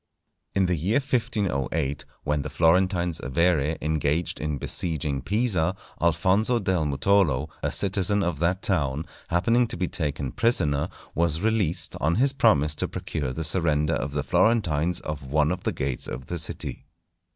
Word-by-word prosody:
In 95 -1 +3
the 90 - +1
year 90 +8 +1
1508, 80 - -1 0.2
when 75 0 0
the 75 - -5
Florentines 85 +3 +2
Avere 80 +2 +1
engaged 80 +1 0
in 75 -2 -2
besieging 75 -2 -1
Pisa, 100 - 0 0.3
Alfonso 95 +8 +2
del 95 -7 0
Mutolo, 75 -1 +2
a - - -1
citizen 100 +1 +1
of 85 -5 -2
that 90 +3 0
town, 75 -5 0 0.2
happening 115 +8 +2
to - - -5
be 90 - -1
taken 70 -6 -3
prisoner, 75 - +1 0.2
was 85 0 0
released 100 -6 0
on 80 +3 +2
his 135 +4 +3
promise 75 - +3
to - - -2
procure 75 -5 -4
the 80 +5 -4
surrender 80 -1 +2
to 70 - -2
the 70 -1 -3
Florentines 90 -1 +2
of 75 -2 -5
one 75 +3 +1
of 90 0 -3
the - - +1
gates 65 -2 -2
of 65 0 -6
the 85 +3 -3
city. 80 - -4
80 Hz, 155 wpm, -25 LUFS, 75-95 Hz, 0.3 s, In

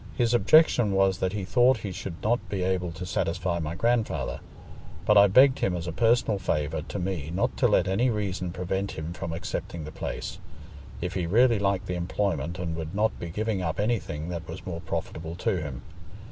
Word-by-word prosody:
His 120 -1 +2
objection 120 -2 +5
was 95 -1 +3
that 95 +1 0
he 100 -3 -3
thought 125 +5 +4
he 100 - -3
should 90 -1 -7
not 120 +3 0
be 95 -3 -2
able 90 -2 0
to 85 +3 -7
satisfy 90 0 -1
my 80 0 -3
grandfather. 110 - 0 0.7
But 105 0 +4
I 100 0 +8
begged 130 +7 +6
him 90 - +1
as 85 -1 -4
a 85 - -3
personal 115 +1 +2
favour 75 -3 -1
to 90 - -6
me 90 -5 -3
not 90 +3 0
to - - +4
let 90 - +3
any 105 +7 +2
reason 95 -5 -2
prevent 95 +2 -2
him 80 +2 -5
from 85 -1 -5
accepting 85 0 -4
the 75 - -7
place, - - -5 0.6
if 90 +1 -3
he 90 -3 -1
really 115 +4 +4
liked 100 -2 0
the 90 - -3
employment 85 -2 -1
and 85 -2 -3
would 80 +3 -5
not 110 +2 +1
be 85 - -5
giving 105 +2 -1
up 80 0 -2
anything 95 -8 -1
that 85 -2 -5
was 80 +3 -7
more 85 -2 -5
profitable 80 +1 -4
to 90 +1 0
him. 70 -5 -6
95 Hz, 200 wpm, -27 LUFS, 85-105 Hz, 0.7 s, I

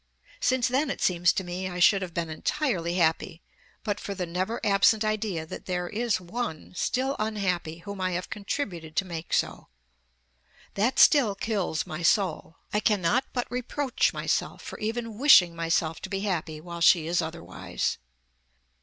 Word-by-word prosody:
Since 260 - +2
then 270 +4 +1
it - - -3
seems 175 -1 +3
to 190 - -2
me 180 +1 -4
I 180 - -6
should 195 +2 +5
have 185 -2 -4
been 165 -2 -2
entirely 175 - -1
happy, 165 0 0 0.4
but 205 -2 -2
for 200 - -5
the 180 -1 -2
never 185 +7 -2
absent 205 +2 +4
idea 215 -6 -1
that - - -9
there 180 -1 -2
is 225 -1 0
one 185 -2 -5
still 265 +8 0
unhappy 180 -6 -2
whom 200 -1 -6
I 185 -1 0
have 180 +1 -3
contributed 185 - -4
to 190 - +1
make 170 -2 -7
so. - - -1 1.1
That 235 +6 +1
still 245 -10 +6
kills 195 -6 -1
my 155 +2 -6
soul. 170 -2 +1 0.2
I 210 - +3
cannot 210 +4 +2
but 245 -1 -2
reproach 255 +2 0
myself - - -2
for - - -8
even 225 0 -3
wishing 185 - +7
myself 165 -1 0
to - - -6
be 195 0 -2
happy 165 -6 -2
while 170 +1 -8
she 165 -1 +5
is 170 +2 +1
otherwise." 165 +1 -4
190 Hz, 165 wpm, -27 LUFS, 170-220 Hz, 1.1 s, wishing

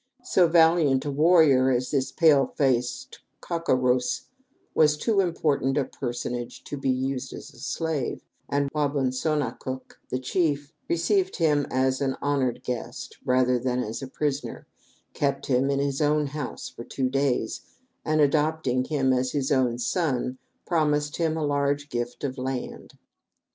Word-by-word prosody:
So 185 -7 +4
valiant 160 -5 +4
a 145 - -1
warrior 150 -4 +5
as 125 0 0
this 135 -2 0
pale 150 -6 +4
faced 125 -3 0 0.2
cau 170 - -3
co 165 -5 +2
rouse 125 0 +1 0.5
was 150 -1 +4
too 210 +5 +1
important 150 -7 +1
a 140 - +2
personage 120 -1 -5
to - - -6
be 135 -1 -2
used 130 0 -1
as 155 - -10
a 120 - -16
slave, 150 0 -2 0.3
and 140 0 +1
Wa 150 -1 +2
bun 140 -3 0
so 155 +4 0
na 130 -6 0
cook, 130 +1 -8
the 130 - -1
chief, 145 +1 -1 0.2
received 375 - +1
him 150 -4 +2
as 130 +1 +1
an 135 -1 0
honored 140 -4 0
guest(1) 125 -2 -5
rather 125 -1 +3
than 125 0 -1
as 110 +5 -5
a 135 - -5
prisoner, 145 +1 -3 0.5
kept 140 -1 -1
him 130 +1 +2
in 140 - +1
his 140 +1 -1
own 150 0 +2
house 145 -1 -5
for 120 - -9
two 130 +2 -2
days, 130 -4 0 0.4
and 155 0 +2
adopting 145 -3 +1
him 135 -3 +1
as 130 0 0
his 140 -2 -1
own 130 -4 +2
son, 130 -1 -1 0.3
promised 150 -3 +1
him 160 -2 0
a 155 - -1
large 145 0 0
gift 120 +1 -4
of 135 -1 -3
land. 130 -1 -5
140 Hz, 165 wpm, -26 LUFS, 130-150 Hz, 0.5 s, warrior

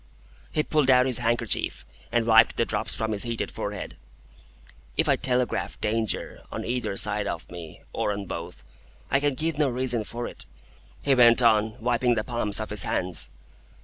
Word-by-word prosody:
He 150 - 0
pulled 150 -4 +1
out 125 -1 +6
his 130 -3 +3
handkerchief, 115 - +2 0.3
and 120 -1 +1
wiped 115 0 +5
the - - +2
drops - - -1
from 110 0 -2
his 105 -2 0
heated 115 -1 -2
forehead. - - -6 1.0
"If - - +2
I - - +4
telegraph 125 -2 -1
Danger, 110 0 -2
on - - -5
either 120 -4 -2
side 105 0 +1
of 85 - -5
me, 85 -3 -10
or - - -1
on 100 -1 -4
both, 85 -1 -7 0.5
I 135 - +4
can 145 -1 0
give 160 +1 -2
no 145 -3 +3
reason 125 -2 -1
for 120 +3 -5
it," - - -5 0.6
he 140 - +3
went 120 -1 +6
on, 110 -1 +3
wiping 120 +1 +1
the 110 - -1
palms 120 -4 -1
of 110 - -5
his 105 -2 +5
hands. 90 0 -1
115 Hz, 180 wpm, -26 LUFS, 105-125 Hz, 1.0 s, out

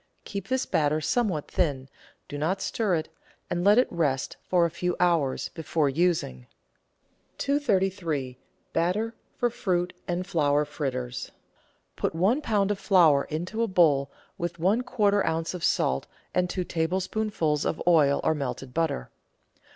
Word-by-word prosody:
Keep 200 -2 -5
this 260 +1 0
batter 150 0 +1
somewhat 180 -2 0
thin, 140 -6 0 0.4
do - - -7
not 160 +7 0
stir 205 -2 0
it, 155 - -3 0.4
and 175 0 0
let 205 +3 +6
it 250 - +5
rest 145 -6 -1
for 175 -2 +2
a 170 - -1
few 180 +1 -2
hours 165 -7 +1
before 160 -2 -1
using. 135 - 0 0.9
333— 190 - 0 0.4
BATTER 190 +7 0 0.2
FOR 245 -2 +2
FRUIT 180 -5 -1
AND 175 +1 -2
FLOWER 150 -5 +2
FRITTERS 130 -4 -4 0.6
Put - - -2
one 205 - +2
lb. 205 -6 +1
of 200 - -2
flour 165 -8 +4
into 175 +9 -3
a 230 - +2
bowl 150 -8 +3 0.3
with 170 0 -3
one 195 +8 +2
quarter 210 -5 +2
oz. 160 +1 -1
of 180 - -6
salt 65 +1 +1 0.3
and 180 0 +1
two 185 - -2
tablespoonfuls 175 -1 -1
of - - -1
oil 150 -5 +4
or 160 - +3
melted 135 -3 -5
butter. 160 - -1
170 Hz, 145 wpm, -27 LUFS, 150-195 Hz, 0.9 s, let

